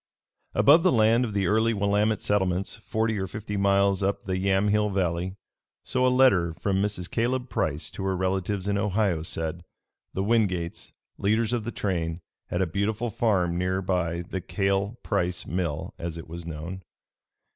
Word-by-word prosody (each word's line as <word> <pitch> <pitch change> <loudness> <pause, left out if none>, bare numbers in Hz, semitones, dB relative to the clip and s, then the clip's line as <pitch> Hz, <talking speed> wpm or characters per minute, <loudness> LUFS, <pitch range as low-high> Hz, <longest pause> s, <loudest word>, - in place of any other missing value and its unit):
Above 150 +4 +6
the 185 +1 +4
land 115 +1 +4
of 115 - -2
the 100 -1 +1
early 110 +2 +2
Willamette 105 +2 +1
settlements 95 -2 0
forty 110 0 -1
or 95 - -2
fifty 105 +1 -5
miles 100 -1 +3
up 100 +1 0
the 95 -1 -1
Yamhill 100 +2 +2
Valley, 90 -1 -1 0.5
so 130 - 0
a - - +5
letter 115 -11 +4
from 95 +1 0
Mrs. 100 -4 -2
Caleb 125 +4 -1
Price 75 -5 -2
to 95 - -6
her 95 -1 0
relatives 95 +1 -1
in 100 0 +1
Ohio 100 -4 +1
said, 80 +1 -3 0.5
the 95 - 0
Wingates, 95 -6 0 0.3
leaders 110 +3 +1
of 115 -3 -1
the 120 - -3
train, 85 -6 -2 0.3
had 90 +2 0
a - - +1
beautiful 105 +6 -1
farm, 90 -6 +1
near 90 +1 0
by 90 -2 -1
the 95 +2 -5
Cale 100 +4 -1
Price 90 -4 -1
Mill, 85 -2 -3
as 85 -1 -4
it 80 - -8
was 85 +1 -8
known. 85 +4 -6
95 Hz, 170 wpm, -26 LUFS, 90-105 Hz, 0.5 s, Above